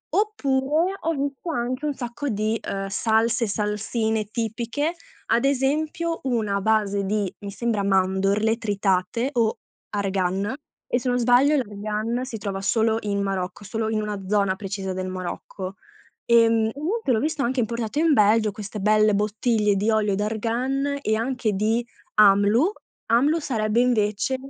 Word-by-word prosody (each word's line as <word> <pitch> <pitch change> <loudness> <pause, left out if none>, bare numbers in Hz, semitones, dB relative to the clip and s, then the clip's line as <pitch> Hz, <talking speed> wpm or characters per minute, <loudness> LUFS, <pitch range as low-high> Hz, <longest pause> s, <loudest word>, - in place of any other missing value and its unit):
Oppure, 320 -3 +1
ho 330 - 0
visto 280 +4 -3
anche 255 -1 -2
un 295 - 0
sacco 245 +4 -4
di, 215 0 -1
uhm, 195 0 -3
salse, 225 +3 +1
salsine 215 +1 -1
tipiche, 230 +8 -2 0.4
ad 235 - +3
esempio 300 +5 0
una 220 -6 0
base 205 -1 +1
di, 205 -1 -1
mi 200 - -7
sembra 220 -1 -1
mandorle 195 +3 +2
tritate 205 +2 0
o 230 -3 +1 0.3
argan, 195 +1 -1 0.3
e 245 - +1
se 250 - -2
non 245 - +2
sbaglio 250 +5 +4
l'argan 215 +1 -2
si 245 -3 -6
trova 200 -2 -4
solo 220 +2 +2
in 200 -1 -1
Marocco, 195 0 -3
solo 220 +2 -2
in 215 -1 0
una 210 -2 -4
zona 200 -1 +2
precisa 195 -1 -4
del 185 0 -3
Marocco. 185 +1 -6 0.5
Ehm, 230 -1 +4
inoltre 320 - -1
l'ho 220 - +2
visto 305 +1 -1
anche 255 +1 0
importato 235 +2 -2
in 320 -1 +4
Belgio, 215 -1 +4
queste 210 0 -7
belle 215 +1 +4
bottiglie 210 +1 +1
di 210 +3 +1
olio 215 -2 +2
d'argan 240 +7 -1
e 220 -3 +1
anche 235 -1 -1
di 220 +4 0 0.3
Amlou; 210 - +5 0.4
Amlou 285 +8 +3
sarebbe 225 -5 0
invece 220 0 +1
220 Hz, 145 wpm, -24 LUFS, 205-250 Hz, 0.5 s, Amlou